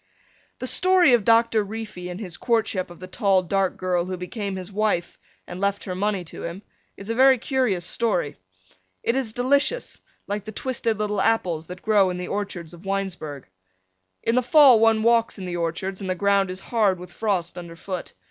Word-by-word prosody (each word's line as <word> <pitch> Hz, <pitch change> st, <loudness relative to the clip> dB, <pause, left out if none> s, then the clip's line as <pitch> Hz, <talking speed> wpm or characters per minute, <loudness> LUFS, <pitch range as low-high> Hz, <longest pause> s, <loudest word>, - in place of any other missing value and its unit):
The -, -, -5 dB
story 365 Hz, 0 st, +4 dB
of 235 Hz, -4 st, +4 dB
Doctor 230 Hz, 0 st, +4 dB
Reefy 205 Hz, -4 st, -7 dB
and 180 Hz, +1 st, -6 dB
his 180 Hz, -7 st, -7 dB
courtship 215 Hz, -6 st, 0 dB
of 175 Hz, -, -13 dB
the 185 Hz, -, -7 dB
tall 190 Hz, 0 st, +2 dB
dark 190 Hz, +1 st, 0 dB
girl 180 Hz, -2 st, 0 dB
who 185 Hz, 0 st, -4 dB
became 195 Hz, +2 st, -4 dB
his 185 Hz, +1 st, -7 dB
wife 205 Hz, -4 st, -1 dB, 0.3 s
and 180 Hz, -, -8 dB
left 200 Hz, 0 st, 0 dB
her 185 Hz, -, -4 dB
money 195 Hz, 0 st, -1 dB
to 165 Hz, -, -10 dB
him 170 Hz, +4 st, -6 dB, 0.3 s
is 200 Hz, +3 st, -6 dB
a -, -, 0 dB
very 260 Hz, +2 st, +6 dB
curious 235 Hz, -9 st, 0 dB
story. 180 Hz, -9 st, 0 dB, 0.7 s
It 230 Hz, -, +1 dB
is 260 Hz, -5 st, -1 dB
delicious, 280 Hz, -, 0 dB, 0.2 s
like 205 Hz, 0 st, -3 dB
the 215 Hz, -, -7 dB
twisted 235 Hz, -2 st, -1 dB
little 210 Hz, 0 st, -1 dB
apples 175 Hz, -8 st, 0 dB
that 180 Hz, 0 st, -9 dB
grow 205 Hz, -3 st, +4 dB
in 180 Hz, -, -3 dB
the 180 Hz, 0 st, -5 dB
orchards 185 Hz, -5 st, -4 dB
of 170 Hz, +1 st, -13 dB
Winesburg. 190 Hz, -8 st, -4 dB, 0.8 s
In 230 Hz, -, +1 dB
the 250 Hz, -, +3 dB
fall 260 Hz, -2 st, +7 dB
one 225 Hz, -1 st, +4 dB
walks 230 Hz, -1 st, +3 dB
in 190 Hz, -, -6 dB
the 175 Hz, -1 st, -3 dB
orchards 175 Hz, +4 st, -3 dB
and 190 Hz, -, -4 dB
the 185 Hz, -, 0 dB
ground 200 Hz, 0 st, +2 dB
is 185 Hz, +1 st, -6 dB
hard 210 Hz, -5 st, +1 dB
with 180 Hz, 0 st, -11 dB
frost 190 Hz, -6 st, -1 dB
underfoot. 175 Hz, +1 st, -7 dB
200 Hz, 195 wpm, -24 LUFS, 180-225 Hz, 0.8 s, fall